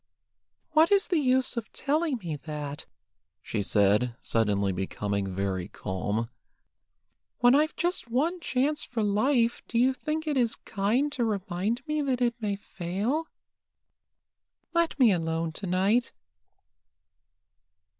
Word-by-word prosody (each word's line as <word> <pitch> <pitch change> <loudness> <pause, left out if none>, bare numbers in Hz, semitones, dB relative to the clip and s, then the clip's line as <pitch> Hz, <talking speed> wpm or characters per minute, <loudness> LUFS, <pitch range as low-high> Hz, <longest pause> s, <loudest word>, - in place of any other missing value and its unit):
"What 315 +3 +5
is 400 0 +4
the 350 -4 +3
use 260 -2 +2
of 230 - -4
telling 300 0 0
me 170 -8 -4
that 145 0 -6 0.3
?" - - -56
she 105 - -2
said, 105 +4 +2
suddenly 100 -3 +1
becoming 100 +2 -2
very 95 -1 -2
calm. 105 +5 -3 1.1
"When 245 0 +5
I've 305 +3 +3
just 350 -8 -1
one 310 +10 0
chance 295 0 0
for 230 -3 -2
life, 230 +4 +2
do 230 - -2
you 255 +3 +4
think 310 +4 -3
it 300 -3 0
is 235 -3 +2
kind 225 +8 0
to 260 -4 -1
remind 210 +3 -1
me 305 0 0
that 265 -3 0
it 240 -1 +2
may 205 -2 0
fail? 200 - -3 1.5
Let 335 -1 +1
me 245 -5 +7
alone 165 -2 -1
to 190 +5 -6
night." 195 +7 +2
225 Hz, 135 wpm, -28 LUFS, -, 1.5 s, me